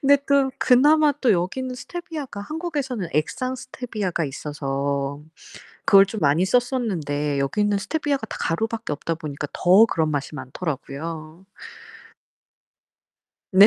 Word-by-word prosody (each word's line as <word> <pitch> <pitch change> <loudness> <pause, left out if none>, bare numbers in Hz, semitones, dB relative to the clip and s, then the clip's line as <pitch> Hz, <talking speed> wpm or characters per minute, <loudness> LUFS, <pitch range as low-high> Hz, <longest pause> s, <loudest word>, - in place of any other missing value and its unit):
근데 285 +1 +6
그 280 -1 +2
그나마 295 +4 +5
또 240 -5 +4
여기는 250 +9 -1
스테비아가 305 -6 -6
한국에서는 280 - -3
액상 255 - -1
스테비아가 215 -9 -3
있어서 140 0 -3 0.7
그걸 195 0 +7
좀 210 +1 -6
많이 150 +5 +3
썼었는데 185 - 0
여기는 205 +9 +1
스테비아가 285 +3 -1
다 - - -6
가루밖에 220 0 -1
없다보니까 150 -2 -4
더 190 +5 +6
그런 160 -7 0
맛이 145 0 -3
많더라고요. 155 +3 -6 2.1
네. 195 +2 +9
195 Hz, 300 characters per minute, -23 LUFS, -, 2.1 s, 네